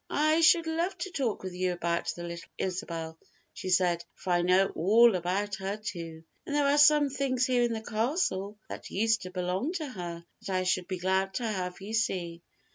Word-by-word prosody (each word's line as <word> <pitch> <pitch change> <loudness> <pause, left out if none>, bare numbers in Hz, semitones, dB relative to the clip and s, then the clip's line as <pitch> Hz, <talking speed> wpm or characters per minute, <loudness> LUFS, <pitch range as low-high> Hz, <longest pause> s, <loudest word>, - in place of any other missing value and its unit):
"I 310 +2 +3
should 335 0 +6
love 335 +4 -1
to 380 - -5
talk 260 - -2
with 185 -1 -5
you 180 0 0
about 170 -1 -1
the 175 - -7
little 170 0 -7
Isabel," 165 -3 -4 0.3
she 185 - -6
said, 175 -2 +2
"for 185 - -4
I 175 - +3
know 185 +2 +3
all 220 +7 +5
about 190 +3 -1
her 195 +2 -3
too, 165 -6 -7 0.2
and 290 - -4
there 290 -1 +3
are 285 +1 +4
some 295 0 +6
things 255 -2 0
here 250 -1 +2
in 240 -1 +1
the 220 -1 -4
castle 215 - -1
that - - -8
used 225 +3 +1
to 185 - -6
belong 185 - -2
to 315 -5 -3
her 175 -7 -7 0.2
that - - -8
I 185 -1 +1
should 185 -1 0
be 185 - -3
glad 190 +1 0
to 245 - -2
have 185 -4 -3
you 205 +3 -7
see. 175 -6 -1
195 Hz, 205 wpm, -29 LUFS, 180-250 Hz, 0.3 s, should